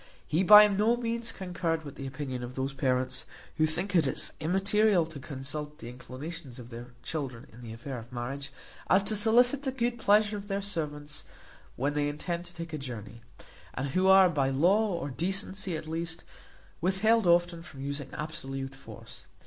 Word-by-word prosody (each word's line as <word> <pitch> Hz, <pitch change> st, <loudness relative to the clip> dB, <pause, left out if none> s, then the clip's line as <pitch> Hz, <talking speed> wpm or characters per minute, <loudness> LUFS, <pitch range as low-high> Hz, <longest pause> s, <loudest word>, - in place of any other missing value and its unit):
He 160 Hz, -, +1 dB
by 210 Hz, +2 st, +10 dB
no 210 Hz, +4 st, +2 dB
means 235 Hz, -1 st, -2 dB
concurred 170 Hz, -3 st, -2 dB
with 140 Hz, -, -7 dB
the 135 Hz, -, -6 dB
opinion 135 Hz, -2 st, -5 dB
of 125 Hz, +1 st, -7 dB
those 135 Hz, +1 st, -2 dB
parents, 130 Hz, -2 st, 0 dB, 0.3 s
who 155 Hz, -1 st, +4 dB
think 180 Hz, +5 st, -2 dB
it 160 Hz, -5 st, +4 dB
as -, -, -3 dB
immaterial 195 Hz, +2 st, +3 dB
to 160 Hz, -3 st, -9 dB
consult 145 Hz, +2 st, -6 dB
the 115 Hz, -, -8 dB
inclinations 130 Hz, +3 st, -8 dB
of 120 Hz, -1 st, -10 dB
their 120 Hz, +1 st, -9 dB
children 135 Hz, -6 st, -4 dB
in 120 Hz, -, -13 dB
the 115 Hz, -2 st, -8 dB
affair 120 Hz, +3 st, -6 dB
of 115 Hz, +2 st, -13 dB
marriage, 135 Hz, +4 st, -5 dB, 0.4 s
as 190 Hz, +1 st, +5 dB
to 215 Hz, -, 0 dB
solicit 245 Hz, +6 st, +4 dB
the 270 Hz, -2 st, -2 dB
good 240 Hz, -2 st, -1 dB
pleasure 210 Hz, 0 st, +4 dB
of 200 Hz, 0 st, -8 dB
their 200 Hz, -1 st, -1 dB
servants 150 Hz, -7 st, -4 dB, 0.5 s
when 140 Hz, +3 st, 0 dB
they 145 Hz, 0 st, +1 dB
intend 170 Hz, +4 st, -4 dB
to 175 Hz, -, -13 dB
take 165 Hz, -1 st, -7 dB
a 155 Hz, -, -3 dB
journey; 115 Hz, -4 st, -7 dB, 0.5 s
and 135 Hz, +2 st, -2 dB
who 185 Hz, +7 st, +2 dB
are 190 Hz, 0 st, +8 dB
by 140 Hz, -6 st, +1 dB
law, 190 Hz, +10 st, +3 dB
or 170 Hz, -5 st, -3 dB
decency 190 Hz, +2 st, -2 dB
at 155 Hz, -, -8 dB
least, 165 Hz, +1 st, -4 dB, 0.6 s
withheld 195 Hz, +4 st, +3 dB
often 175 Hz, 0 st, +3 dB
from 140 Hz, -5 st, -11 dB
using 140 Hz, 0 st, -4 dB
absolute 135 Hz, -4 st, -5 dB
force. 135 Hz, -, -12 dB
160 Hz, 180 wpm, -29 LUFS, 135-195 Hz, 0.6 s, by